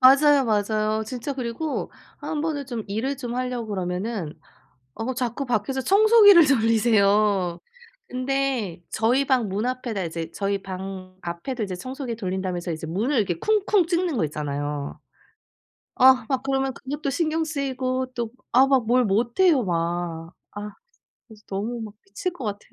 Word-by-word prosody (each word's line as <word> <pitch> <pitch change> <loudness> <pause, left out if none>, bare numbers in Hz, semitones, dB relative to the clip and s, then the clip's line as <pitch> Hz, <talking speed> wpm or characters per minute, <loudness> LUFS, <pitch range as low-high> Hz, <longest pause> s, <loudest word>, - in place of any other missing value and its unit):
맞아요, 275 +1 +6
맞아요. 215 0 +1
진짜 250 +4 -4
그리고 260 +5 -3 0.3
한 300 - -3
번은 295 -3 -2
좀 235 -4 -4
일을 230 +8 -2
좀 245 -2 -5
하려고 250 -3 -3
그러면은 185 -2 -3 0.6
어 230 +4 -3
자꾸 250 +2 -2
밖에서 245 +3 -1
청소기를 405 - +7
돌리세요. 215 -6 +3 0.5
근데 255 -8 -1
저희 245 +5 +2
방 250 -6 +2
문 205 +5 -1
앞에다 250 -5 -2
이제 165 0 -5
저희 200 -1 -2
방 185 -1 -7
앞에도 175 +9 -4
이제 190 -3 -3
청소기 255 +3 -5
돌린다면서 185 -4 -3
이제 160 0 -5
문을 220 - -1
이렇게 190 -7 +1
쿵쿵 415 - +2
찧는 345 -3 0
거 175 - +1
있잖아요. 145 -1 -4 1.0
아 260 -2 +6
막 265 -2 0
그러면 270 -1 0
그것도 280 +1 -4
신경 320 +2 0
쓰이고 260 -4 -2
또 235 -3 -3 0.2
아 260 +3 +6
막 265 -4 +2
뭘 250 +1 +4
못해요 240 - +3
막. 170 -1 -2 0.2
아 205 0 -6 0.6
그래서 215 -2 -16
너무 225 +5 -3
막 215 -2 -7
미칠 370 -2 -4
것 265 -9 -7
같아. 205 0 -3
235 Hz, 305 characters per minute, -24 LUFS, 195-270 Hz, 1.0 s, 청소기를